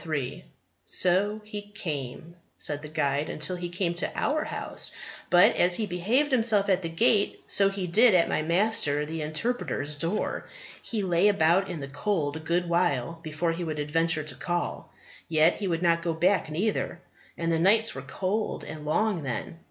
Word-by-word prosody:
"So 200 +4 +1
he 210 -1 -6
came," 165 - -6 0.2
said 145 -1 -1
the 150 - -7
guide, 145 -1 -1
"till 155 +5 +1
he 175 0 -5
came 175 0 -1
to 175 - -3
our 305 +1 0
House; - - -2 0.4
but 175 0 +6
as 175 0 +4
he 220 - 0
behaved 220 +11 0
himself 225 -5 +3
at 190 -1 +3
the 165 - -3
Gate, 200 +4 +1
so 195 -1 +3
he 195 -1 -4
did 215 +5 +5
at 170 - +4
my - - 0
Master 170 -3 +1
the 160 +1 -5
Interpreter's 155 - -2
door. 165 +8 -2 0.3
He 215 -3 -3
lay 180 +1 +3
about 190 -1 +3
in 170 -4 -5
the 140 - -5
cold 145 0 -1
a - - -6
good 170 +3 -1
while 165 -3 0
before 160 +1 -2
he 170 +2 -4
would 155 -2 -4
adventure 155 +2 +1
to 155 - -6
call. 175 -1 -3 0.4
Yet 160 +1 +3
he 200 - -3
would 170 -1 -1
not 170 -1 +3
go 170 -1 -2
back 180 +1 +2
neither. 175 +2 -1 0.4
And 165 0 -1
the 165 - +1
nights 215 +6 +3
were 135 - -6
cold 190 +10 -3
and 155 - -8
long 185 +4 0
then. 135 +4 -5
175 Hz, 180 wpm, -27 LUFS, 155-200 Hz, 0.4 s, but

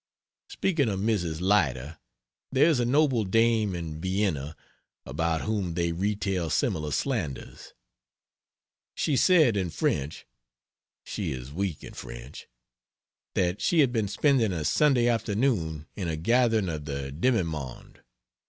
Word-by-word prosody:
Speaking 170 - 0
of 95 -2 -2
Mrs. 90 -7 -1
Leiter, 80 -7 +1 0.5
there 135 +2 +4
is 160 -6 +3
a 120 - +1
noble 135 -2 +3
dame 110 -1 +2
in 80 -2 -5
Vienna, 90 -6 -1 0.5
about 80 +4 -1
whom 100 -6 -2
they 85 -1 0
retail 95 -1 -1
similar 75 -1 0
slanders. 90 - -3 1.2
She 145 - 0
said 155 - +5
in 95 -3 -1
French 70 -1 -2 0.8
she - - -4
is 65 +2 -8
weak 95 -2 -3
in - - -9
French - - -9 0.9
that 90 +1 0
she 170 -3 +3
had 135 -4 +3
been 110 -4 0
spending 120 0 +2
a 80 -4 -3
Sunday 135 - +3
afternoon 105 - 0
in 95 -4 -3
a 80 -1 -2
gathering 115 +3 +2
of 75 -3 -4
the 70 -2 -4
"demimonde." 80 - -2
95 Hz, 130 wpm, -27 LUFS, 80-115 Hz, 1.2 s, said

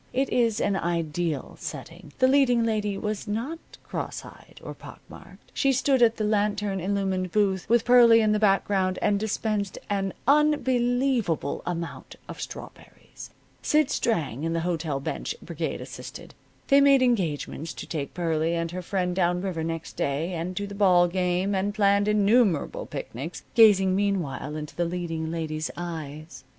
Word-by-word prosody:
It 270 +1 0
is 230 -3 +2
an 200 - +1
ideal 170 -3 -2
setting. - - -8
The 255 - +4
leading 260 -3 +4
lady 210 -3 -1
was 210 0 -4
not 235 +11 -3 0.2
cross - - -5
eyed - - -15
or - - -6
pock - - -12
marked. - - -15
She 275 - +2
stood 265 0 +2
at 230 -1 +4
the 215 - -2
lantern 210 -2 0
illumined 190 -1 -1
booth, 195 -2 0
with 235 0 +3
Pearlie 240 -2 +7
in 215 -1 +3
the 210 - +2
background, 195 -2 +2
and 205 -1 +1
dispensed 215 -1 -2
an 195 -1 -1
unbelievable 255 - +2
amount 170 -1 -5
of - - -8
strawberries. - - -10 0.3
Sid 300 -2 +2
Strang 150 - -1
and 165 0 -1
the 165 - 0
hotel 160 -4 -2
bench 140 - -4
brigade - - -4
assisted. - - -9 0.4
They 275 0 +6
made 275 -2 +5
engagements 165 - -1
to - - -7
take 145 -4 -5
Pearlie 165 -1 0
and 165 0 -2
her 185 +1 -5
friend 180 0 -2
down 175 -1 +1
river 175 -4 -3
next 165 0 -5
day, 155 +6 -1
and 175 +2 -4
to 205 - -2
the 200 - -8
ball 185 -3 +4
game, 180 +2 0
and 200 +2 -1
planned 200 -1 +3
innumerable 210 - +2
picnics, 145 +9 -6
gazing 195 -5 +6
meanwhile 175 -8 -1
into 150 -1 -7
the 175 - 0
leading 165 -2 -3
lady's 155 -2 -3
eyes. 155 -3 -7
195 Hz, 160 wpm, -26 LUFS, 170-220 Hz, 0.4 s, Pearlie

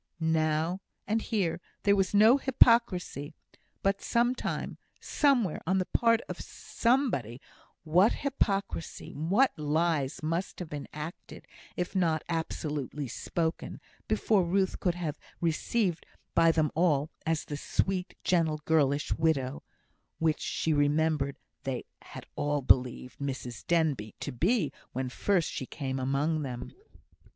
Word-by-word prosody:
Now, 160 +2 +1 0.2
and 220 +2 0
here, 180 -7 -1 0.2
there 200 -1 +5
was 195 -2 +1
no 220 +5 +7
hypocrisy; 230 - +3 0.5
but 195 0 +1
some 240 +1 +2
time, - - -4 0.2
somewhere, 250 - +2
on 190 +2 +3
the 185 - +1
part 230 +2 +3
of - - -6
somebody, 230 - 0 0.4
what 180 +7 +4
hypocrisy, 200 - -2
what 195 - +3
lies 150 -2 0
must 165 +4 -2
have 175 -4 -6
been 145 -1 -5
acted, 155 +3 -8 0.3
if 180 +2 -3
not 165 -4 +2
absolutely 150 -4 -3
spoken, 165 +7 -3 0.3
before 205 -4 +2
Ruth 190 +2 0
could 175 -2 0
have 160 -4 -4
been - - -24
received 175 +2 0 0.3
by 165 0 +5
them 155 -2 +1
all 155 -3 +2
as 160 -1 -1
the 145 - -5
sweet, 185 +5 -1
gentle, 165 -4 +2
girlish 145 -3 +2
widow, 140 -5 0 0.6
which 160 -1 +1
she 160 - 0
remembered 145 -1 +2 0.3
they 135 -3 -3 0.2
had - - -10
all 145 -1 0
believed 125 0 +2
Mrs 130 -4 -5
Denbigh 150 -11 +1
to - - -3
be 165 - +1 0.2
when 130 0 -2
first 175 +5 +1
she 130 - -5
came 135 -3 -4
among 140 +4 0
them! 125 -3 -5
160 Hz, 130 wpm, -29 LUFS, 145-190 Hz, 0.6 s, no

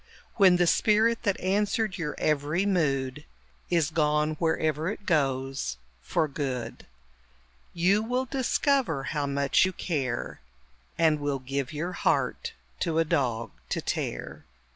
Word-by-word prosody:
When 190 -4 +7
the 175 - +3
spirit 220 +6 +3
that 200 -5 0
answered 205 +1 0
your 150 -3 -3
every 155 +5 +1
mood 145 -7 0 0.5
Is 165 -3 +2
gone 150 -1 +2
wherever 160 -1 0
it 210 -1 -6
goes 135 - 0 0.2
for 155 - 0
good, 130 -5 -4 0.8
You 185 +5 +2
will 250 +3 -1
discover 260 - +1
how 145 +1 -2
much 140 0 +2
you 185 - +2
care, 135 -10 -3 0.6
And 160 -2 +3
will 145 -1 -1
give 135 +1 -3
your 160 +4 -3
heart - - 0 0.3
to 160 -1 -1
a 165 - +3
dog 130 -8 0 0.2
to - - -1
tear! - - -4
155 Hz, 130 wpm, -27 LUFS, 140-185 Hz, 0.8 s, When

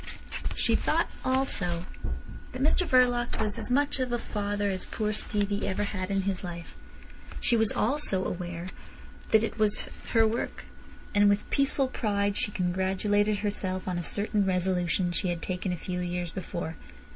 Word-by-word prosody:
She - - +2
thought - - +1
also 185 -10 0 0.7
that 255 +1 -2
Mr 340 +4 +3
Verloc 245 -2 +3
was 215 -2 -1
as - - 0
much 280 +2 +2
of 255 -1 -1
a 240 - +1
father 205 -2 -1
as 185 -1 -2
poor 215 -1 -1
Stevie 205 -1 0
ever 195 +2 0
had 195 -2 -3
in 195 -1 +1
his 195 -1 -2
life. 170 -2 -7 0.7
She 240 - +2
was 220 -2 +4
aware - - +1
also 245 -9 +1 1.0
that 220 0 +5
it 225 - -3
was 210 -1 +4 0.3
her 225 -1 +6
work. 225 +2 -2 0.5
And 205 0 +5
with 205 0 +1
peaceful 275 -1 +2
pride 205 -5 0
she - - +1
congratulated 195 +3 +1
herself 190 -3 -2
on 180 -1 -1
a - - -1
certain 205 +3 +1
resolution 180 -1 +1
she 180 +2 0
had 170 -1 -3
taken 185 0 -2
a 180 - -2
few 180 +2 -4
years 175 -1 -2
before. 170 -3 -5
205 Hz, 165 wpm, -28 LUFS, 185-220 Hz, 1.0 s, her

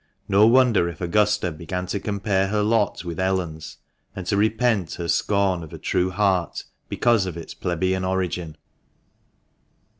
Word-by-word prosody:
No 100 +2 +5
wonder 120 -7 +4
if 85 - -9
Augusta 105 +1 +1
began 90 +4 -5
to 100 +2 -3
compare 100 -1 0
her 105 +1 0
lot 105 -4 +1
with 85 -1 -5
Ellen's, 90 -5 -2 0.4
and 95 - -6
to 90 - 0
repent 110 -3 +1
her 85 - -5
scorn 100 -1 +1
of 80 -2 -10
a - - -6
true 90 +1 0
heart 95 -2 0 0.3
because 115 -6 +2
of 85 -2 -5
its 80 -2 -8
plebeian 95 +1 -1
origin. 90 -4 -2
95 Hz, 150 wpm, -23 LUFS, 85-105 Hz, 0.4 s, No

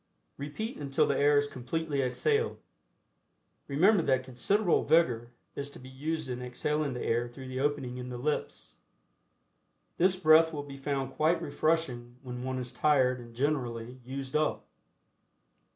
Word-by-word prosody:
Repeat 150 - -5
until 140 -2 +1
the 140 - +1
air 145 +1 +4
is 145 - +3
completely 145 +2 -2
exhaled. 435 - +1 1.1
Remember 180 +8 +4
that 130 -4 +2
considerable 170 - +1
vigor 120 -8 +3 0.3
is 140 0 -4
to - - -12
be 130 - -11
used 155 +3 -3
in 125 -1 -4
exhaling 140 +3 -1
the 125 - -4
air 120 +1 +1
through 130 +2 -10
the 130 0 -4
opening 135 -3 -1
in 125 0 -6
the 125 - -5
lips. 150 +5 -3 1.2
This 185 +2 +4
breath 160 -2 +6
will 145 -2 -4
be 140 -1 -9
found 135 -1 -2
quite 160 +4 +2
refreshing 145 -6 -1
when 125 -1 -6
one 130 0 -2
is 125 -1 -5
tired 130 -2 +3
and 115 -1 -12
generally 125 -3 -2
"used 135 +2 -6
up." 155 0 +1
140 Hz, 150 wpm, -30 LUFS, 125-155 Hz, 1.2 s, breath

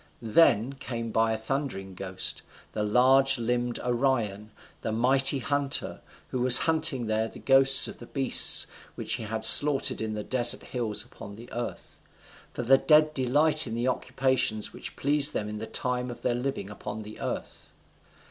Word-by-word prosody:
Then 115 0 +1
came 115 -4 -8
by 115 +1 0
a 110 - -3
thundering 110 -6 -6
ghost, 95 0 -4 0.3
the 105 - -6
large 130 +5 +2
limbed 120 0 -3
Orion, 120 -5 -3 0.3
the - - -5
mighty 130 +5 0
hunter, 140 +1 -3 0.3
who 130 - -4
was 125 0 +9
hunting 155 -6 -1
there 110 0 -2
the - - -14
ghosts 135 0 +5
of - - -11
the 120 - -13
beasts 135 -2 +5 0.3
which - - -5
he - - -7
had 110 +1 -2
slaughtered 145 0 +6
in 110 -1 -5
desert 120 +1 +1
hills 115 -5 -5
upon 100 - -13
the 115 +3 -15
earth. 120 +1 -8 0.5
For 120 - -7
the 135 +3 +3
dead 155 0 +2
delight 145 +3 +1
in 115 - -6
the 120 +2 -2
occupations 130 -5 -2
which - - -8
pleased 145 +1 +1
them 105 - -4
in 105 0 -8
the 110 - -8
time 125 +2 -3
of 120 -1 -11
their 125 - -1
living 120 -5 -6
upon 105 +1 -9
the 105 +1 -13
earth. - - -8
120 Hz, 165 wpm, -25 LUFS, 110-135 Hz, 0.5 s, was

